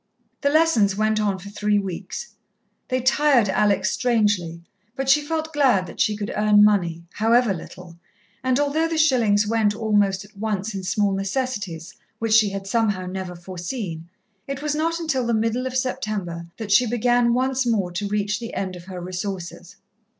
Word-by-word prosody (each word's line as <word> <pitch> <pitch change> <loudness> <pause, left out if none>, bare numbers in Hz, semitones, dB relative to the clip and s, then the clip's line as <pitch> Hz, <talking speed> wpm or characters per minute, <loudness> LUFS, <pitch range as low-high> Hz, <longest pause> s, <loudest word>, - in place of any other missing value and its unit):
The 280 - +2
lessons 285 -11 +3
went 215 +1 +1
on 200 -2 0
for 195 +2 -10
three 210 0 +1
weeks. 195 - -5 0.5
They 255 -1 -1
tired 260 -4 +3
Alex 200 -1 +2
strangely, 205 -9 0 0.3
but 270 0 -3
she 295 +2 +5
felt 320 +1 -3
glad 260 -10 +3
that 170 - -11
she 210 -1 +2
could 205 0 -4
earn 210 0 +5
money, 175 -6 +2
however 230 0 +3
little; 175 0 -10 0.5
and 260 +1 +2
although 295 +3 +1
the 330 -1 -2
shillings 235 -9 +3
went 215 -1 +1
almost 205 -3 +1
at 205 +1 -21
once 210 0 -3
in 195 - -4
small 200 +2 +1
necessities 195 -4 -3 0.2
which 225 -1 -1
she 215 -2 +5
had 195 0 -5
somehow 205 -3 0
never 185 -1 -5
foreseen, 175 -1 -6 0.4
it 275 +1 -5
was 300 -1 0
not 330 +2 -1
until 270 -7 -1
the 235 - +2
middle 230 +3 0
of 255 0 -2
September 215 -10 -3
that 220 -3 -5
she 240 +4 +5
began 240 +1 +2
once 260 0 0
more 200 -6 0
to 195 +4 -3
reach 205 0 -1
the 230 -1 -7
end 185 -2 -3
of 175 -1 -11
her 185 -1 -7
resources. 180 0 -6
210 Hz, 175 wpm, -23 LUFS, 190-250 Hz, 0.5 s, she